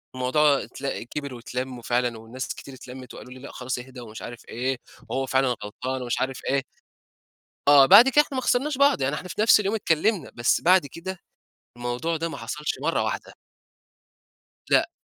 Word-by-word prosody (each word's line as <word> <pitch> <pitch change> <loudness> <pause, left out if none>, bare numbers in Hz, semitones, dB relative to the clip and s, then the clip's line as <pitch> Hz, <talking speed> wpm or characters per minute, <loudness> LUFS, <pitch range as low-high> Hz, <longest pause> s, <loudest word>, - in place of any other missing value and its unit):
الموضوع 140 +3 +3
اتل 135 -3 -5
كبر 140 +2 -6
واتلم، 125 +1 -5
وفعلًا 120 -1 0
والناس 120 +4 -6
كتير 135 - -11
اتلمت 130 0 -10
وقالوا 125 - -11
لي: 130 - -12
"لأ 140 - -9
خلاص 125 0 -4
اهدا 125 0 -10
ومش 110 -2 -9
عارف 120 0 -9
إيه، 130 +2 -2 0.3
وهو 135 0 -1
فعلًا 130 0 +2 0.2
غلطان 130 +5 -4
ومش 120 -1 -2
عارف 130 0 -2
إيه." 135 0 +1 1.1
آه، 140 -2 +8
بعد 225 - +9
كده 295 +3 +6
إحنا 270 - -7
ما 255 - -1
خسرناش 265 +3 +1
بعض 280 - +4
يعني 140 +3 +1
إحنا 185 - -6
في 210 - -4
نفس 215 -1 +6
اليوم 200 +2 -1
اتكلمنا، 180 -2 +1
بس 120 0 +2
بعد 180 -3 +4
كده 180 +6 -7 0.6
الموضوع 120 +7 -2
ده 165 +1 -2
ما - - -6
حصلش 150 0 -4
مرّة - - +1
واحدة. - - -4 1.4
لأ، - - +3
135 Hz, 180 wpm, -25 LUFS, 125-170 Hz, 1.4 s, بعد